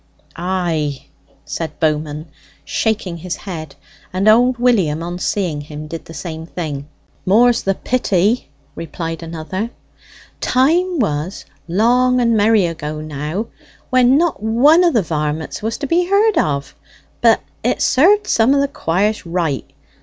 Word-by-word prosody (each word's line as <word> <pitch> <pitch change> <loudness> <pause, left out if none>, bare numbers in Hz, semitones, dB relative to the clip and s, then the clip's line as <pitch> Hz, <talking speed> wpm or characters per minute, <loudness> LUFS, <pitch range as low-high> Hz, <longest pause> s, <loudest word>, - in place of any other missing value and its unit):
"Ay!" 170 -6 -2 0.4
said 165 -1 -5
Bowman, 155 -1 -1 0.4
shaking 210 -6 -1
his 175 +1 -4
head; 160 -6 -7 0.4
and 190 +3 0
old 240 +3 +5
William, 190 -11 +2
on 175 +1 -5
seeing 180 -6 -1
him, 150 +1 -8
did 165 +2 -7
the 165 - -11
same 160 +1 -6
thing. 150 -5 -5 0.4
"More's 230 +5 +4
the 195 0 0
pity," 215 -2 0 0.2
replied 165 0 -5
another. 165 +6 -4 0.7
"Time 335 +8 +2
was 175 - -2 0.2
long 245 +7 +3
and 235 -2 +2
merry 215 -2 +4
ago 155 -2 -4
now! 155 +7 -4 0.5
when 255 +1 +5
not 335 - 0
one 265 +11 +4
of 340 -6 +3
the 220 - +3
varmits 150 -1 -3
was 225 +1 -2
to - - -4
be 345 +5 +1
heard 415 +1 +3
of; 140 -1 -1 0.5
but - - +4 0.2
it - - 0
served 405 +10 +4
some 230 +5 +3
of - - +3
the 280 - +1
quires 205 - -1
right. 165 -5 -2
185 Hz, 140 wpm, -18 LUFS, 160-245 Hz, 0.7 s, old